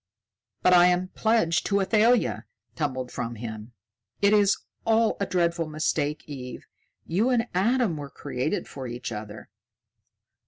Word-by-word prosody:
"But 180 - +5
I 175 0 +7
am 180 +1 +1
pledged 220 -8 +1
to 200 -1 +2
Athalia!" 220 +5 +2 0.3
tumbled 130 -5 -3
from 120 -1 -4
him. 110 0 -7 0.5
"It 200 +1 +4
is 205 -1 +4 0.3
all 225 0 +3
a 200 - -1
dreadful 170 -2 0
mistake, 155 -1 -1
Eve. 130 -4 -8 0.4
You 200 +9 +1
and 245 -2 +2
Adam 215 -1 +2
were 145 -1 -7
created 140 +7 -3
for 130 -2 -7
each 120 0 -5
other." 105 -1 -8
170 Hz, 135 wpm, -26 LUFS, 130-205 Hz, 0.5 s, I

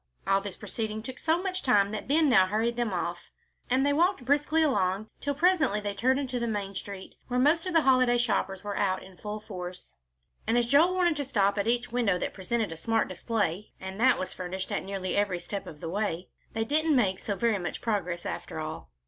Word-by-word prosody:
All 195 0 +3
this 200 -2 -5
proceeding 220 -1 -4
took 255 +1 -7
so 330 +3 +1
much 370 -1 -2
time 205 -6 +3
that 215 - -5
Ben 305 +3 +4
now 190 -8 +5
hurried 225 +4 0
them 240 -3 -1
off, 175 -1 -3 0.4
and 260 +2 +3
they 285 - +3
walked 335 -3 +2
briskly 295 +4 +3
along 205 -6 0
till 285 0 -2
presently 320 - +3
they 205 -1 -3
turned 260 +6 +2
into 255 -3 -2
the 235 - -1
main 205 -3 -3
street 195 -1 -7
where 250 0 0
the - - +4
most 330 +5 +3
of 365 - -2
the 325 - +6
holiday 255 -2 +4
shoppers 195 -5 0
were 205 -1 -4
out 190 -2 0
in 190 0 -14
full 210 0 -5
force. 180 -4 -8 0.5
And 230 - +3
as 240 - +3
Joel 320 +8 +5
wanted 350 -4 +2
to 285 - -2
stop 200 -5 +2
at 200 - 0
each 240 0 +1
window 230 -6 +2
that - - -3
presented 215 +1 -2
a 165 - -6
smart 225 +7 0
display, 200 0 -2
and 190 +2 -7
that 260 +1 +5
was 185 - -4
furnished 185 +1 -5
at - - -1
nearly 190 -2 -3
every 200 -3 +1
step 195 +3 -5
of 150 - -10
the 165 - -4
way, 185 -2 -2 0.2
they 225 0 -1
didn't 310 +4 +2
make 195 -7 +2
so 205 - -3
very 225 -2 +1
much 175 - -4
progress 180 -6 -2
after - - -5
all. 155 - -6
215 Hz, 225 wpm, -28 LUFS, 190-260 Hz, 0.5 s, the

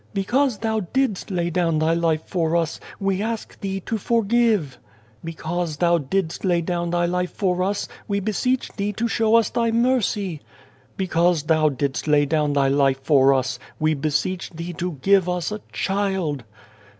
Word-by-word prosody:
" - - -32
Because 240 +5 +1
Thou 220 +1 -1
didst 215 +2 -1
lay 175 -2 -1
down 165 -2 +1
Thy 160 +1 +2
life 165 -2 +1
for 165 -2 0
us, 165 -1 0 0.2
we 195 -1 0
ask 225 +1 -4
Thee 195 -1 -3
to 225 +4 -3
forgive. 225 - +1 0.2
" 110 +1 -32
Because 165 0 -3
Thou 170 +1 +3
didst 165 +4 -2
lay 180 -3 +2
down 170 0 -2
Thy 175 0 +1
life 180 +1 -1
for 185 -3 0
us, 200 +2 -1 0.2
we 200 -1 0
beseech 220 +6 -1
Thee 205 0 -2
to 230 +4 -1
show 225 -1 +2
us 230 -3 +3
Thy 235 -1 +1
mercy. 225 - 0 0.3
" 130 -1 -33
Because 175 -3 +2
Thou 155 0 +3
didst 140 +1 -2
lay 150 -1 +4
down 150 0 +1
Thy 140 -1 +3
life 135 -1 +2
for 135 -2 +5
us, 130 -1 0 0.2
we 155 0 +2
beseech 155 +5 -1
Thee 170 +2 -6
to 175 +1 -3
give 195 -2 +4
us 180 +2 -2
a 210 0 -5
child. 190 - -1
175 Hz, 180 wpm, -22 LUFS, 155-200 Hz, 0.3 s, for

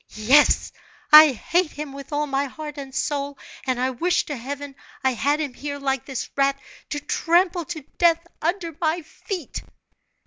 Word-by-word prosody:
"Yes, 250 +8 +4 0.4
I 305 0 +11
hate 340 +7 0
him 295 -2 -6
with 275 +1 -10
all 295 0 0
my 275 0 0
heart 295 +1 -7
and 270 -1 -8
soul, 285 -1 -2 0.3
and 255 -1 0
I 255 +1 +1
wish 345 +8 +1
to 295 - -4
heaven 280 +3 -6 0.3
I 265 - +3
had 285 +6 +1
him 290 -5 -3
here, 285 +2 -5
like 270 -2 -2
this 265 -4 -4
rat, 275 0 +2 0.3
to 290 - -2
trample 345 +3 +1
to 330 -2 -6 0.2
death 335 -1 +4 0.2
under 335 -1 -2
my 325 +1 0
feet!" 355 - -6
290 Hz, 170 wpm, -23 LUFS, 275-325 Hz, 0.4 s, I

